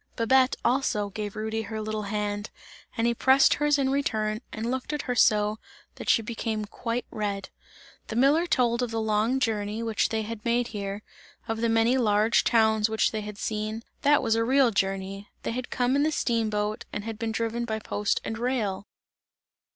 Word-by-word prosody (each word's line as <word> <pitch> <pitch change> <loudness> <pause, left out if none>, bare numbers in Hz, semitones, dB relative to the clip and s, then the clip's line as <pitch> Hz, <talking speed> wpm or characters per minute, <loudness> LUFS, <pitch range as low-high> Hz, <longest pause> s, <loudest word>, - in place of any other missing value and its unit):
Babette 260 +3 +3
also, 215 -6 +1
gave 205 0 -5
Rudy 220 +1 -2
her 220 0 -5
little 215 0 -3
hand 205 0 -2 0.5
and 230 - +1
he 235 - +3
pressed 265 +3 +5
her's 295 0 +2
in 270 -1 +1
return 220 -6 -1
and 230 +2 -3
looked 260 +3 -3
at 295 - -2
her, 250 - -1
so 210 -2 +3 0.3
that - - -6
she 225 - +4
became 220 -1 -3
quite 230 +3 -3
red. 200 -2 -3 0.6
The 220 - -5
miller 285 +8 +4
told 240 -5 +2
of 245 - -1
the 225 0 -2
long 220 +4 +1
journey 215 -2 -1
which 225 -2 0
they 220 -1 -1
had 220 0 -7
made 235 +1 +1
here, 200 -1 -5 0.4
of 225 -1 -2
the 230 - +2
many 225 +3 +3
large 215 0 +3
towns 220 -1 +3
which 220 0 +1
they 220 - -3
had 210 -1 -7
seen 215 +2 -3 0.2
that 290 0 +4
was 225 -2 +2
a 225 0 +2
real 260 0 +4
journey; 195 0 -2
they - - -2
had 255 +2 -4
come 250 +1 +1
in 285 - +3
the 310 +2 +2
steam 230 -6 0
boat 210 0 -2
and 205 - -4
had 220 -1 -6
been 225 -1 -2
driven 230 +1 -2
by 220 -2 -2
post 210 -1 -1
and 225 - -4
rail! 220 -6 -1
225 Hz, 195 wpm, -27 LUFS, 210-245 Hz, 0.6 s, pressed